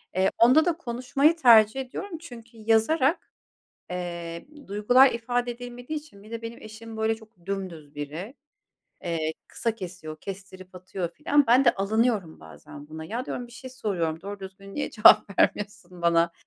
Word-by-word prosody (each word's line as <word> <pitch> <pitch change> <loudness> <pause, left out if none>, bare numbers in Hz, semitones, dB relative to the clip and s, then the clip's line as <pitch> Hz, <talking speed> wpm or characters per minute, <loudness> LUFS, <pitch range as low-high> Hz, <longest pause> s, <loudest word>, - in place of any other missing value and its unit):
Eee, 190 +1 +3
onda 255 +7 +6
da 345 -2 +1
konuşmayı 275 +3 +1
tercih 230 -5 +6
ediyorum. 330 +8 -6
Çünkü 235 -7 -12
yazarak, 230 - +2 0.6
eee, 170 -2 -5 0.2
duygular 245 +7 +5
ifade 245 +1 -1
edilmediği 245 +4 -6
için 295 -10 -16
bir 215 - -15
de 230 0 -6
benim 230 +1 -8
eşim, 220 +1 -10
böyle, 220 0 +1
çok 220 -5 -18
dümdüz 180 -7 -5
biri. 155 - -6 0.7
Eee, 160 -2 -1 0.2
kısa 230 -1 -2
kesiyor, 180 -6 -8
kestirip 185 -1 -9
atıyor 185 -1 -5
filan. 290 - +2
Ben 250 +4 +5
de 240 - +5
alınıyorum 210 -3 0
bazen 145 0 -12
buna. 160 +1 -8
Ya, 235 +9 -4
diyorum, 245 - -4
bir 240 - -17
şey 260 +1 -10
soruyorum, 175 -10 -2
doğru 200 +2 -7
düzgün 195 +1 -10
niye 290 - -2
cevap 210 -3 +6
vermiyorsun 185 -4 0
bana? 170 0 +3
215 Hz, 155 wpm, -26 LUFS, 185-245 Hz, 0.7 s, onda